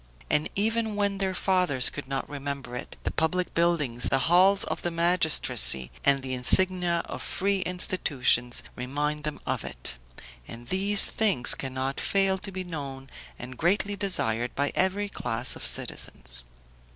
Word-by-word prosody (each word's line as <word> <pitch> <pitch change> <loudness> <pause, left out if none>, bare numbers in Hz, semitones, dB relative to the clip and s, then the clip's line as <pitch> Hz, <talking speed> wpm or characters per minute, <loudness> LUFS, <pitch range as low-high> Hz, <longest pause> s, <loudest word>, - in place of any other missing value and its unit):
And 150 - +1
even 220 +1 -1
when 200 -1 -1
their 190 -1 -1
fathers 180 -10 +1
could 145 -2 -8
not 135 0 -4
remember 140 -3 -6
it, 125 - -8
the - - -2
public 180 +3 -1
buildings, 155 -8 0
the 135 - +2
halls 190 +3 +5
of - - -3
the 175 - -2
magistracy, 160 - +1
and 135 -1 +3
the 130 -1 -4
insignia 175 +6 +3
of - - -7
free 200 +1 -1
institutions, 140 -9 0
remind 145 +4 -3
them 150 - -4
of - - -3
it; - - -5 0.5
and 120 +1 -10
these 195 +2 +7
things 195 - +4
cannot 130 0 -4
fail 195 -1 +1
to 195 - -7
be 185 0 -5
known 140 -6 -8 0.3
and 125 +1 -10
greatly 200 +4 +1
desired 120 - -1
by 140 +1 -1
every 190 +2 0
class 120 - -2
of - - -10
citizens. - - -3
160 Hz, 150 wpm, -26 LUFS, 130-190 Hz, 0.5 s, these